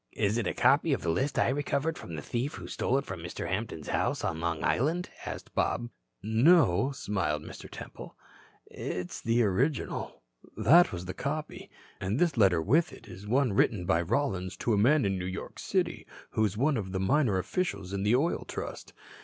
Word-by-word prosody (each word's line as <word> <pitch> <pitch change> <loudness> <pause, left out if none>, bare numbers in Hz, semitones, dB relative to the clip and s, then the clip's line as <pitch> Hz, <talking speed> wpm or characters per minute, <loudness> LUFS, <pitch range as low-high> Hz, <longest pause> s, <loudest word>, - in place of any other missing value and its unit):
"Is 105 +4 +1
it 115 - -1
a - - -1
copy 140 +4 +4
of - - -2
the 85 - +1
list 135 - -1
I - - +3
recovered 145 +3 0
from 85 - -8
the 75 - -6
thief 125 +5 -2
who - - -8
stole 130 - 0
it 140 - -2
from 95 - -6
Mr. 85 +1 -5
Hampton's 95 -5 -3
house - - 0
on 80 - -1
Long 85 -1 -2
Island?" 165 +8 0 0.2
asked - - -7
Bob. 120 0 0 0.3
"No," 120 - +4
smiled 95 - -2
Mr. - - -10
Temple. - - -9 0.5
"It - - -16 0.3
is - - -8
the 115 +1 +2
original. 120 - -1 0.3
That 175 +4 +6
was 90 0 -5
the 90 - -4
copy. 150 +8 -4 0.3
And 95 +4 -1
this 170 -1 +2
letter 95 -7 +4
with 160 - +3
it - - -13
is 100 +2 -10
one 125 0 +2
written 100 -2 +2
by 85 -2 +2
Rollins 95 - -1
to 115 - 0
a - - +4
man 135 +8 +4
in 95 -1 0
New 90 - -3
York 95 - -6
City - - -1 0.2
who 110 - +1
is 105 0 -2
one 140 +3 +2
of 95 -3 -4
the 95 - -1
minor 120 0 +2
officials 100 - -2
of 100 0 -1
the 105 +4 +4
Oil 155 +7 +1
Trust. - - -6
110 Hz, 200 wpm, -29 LUFS, 95-140 Hz, 0.5 s, That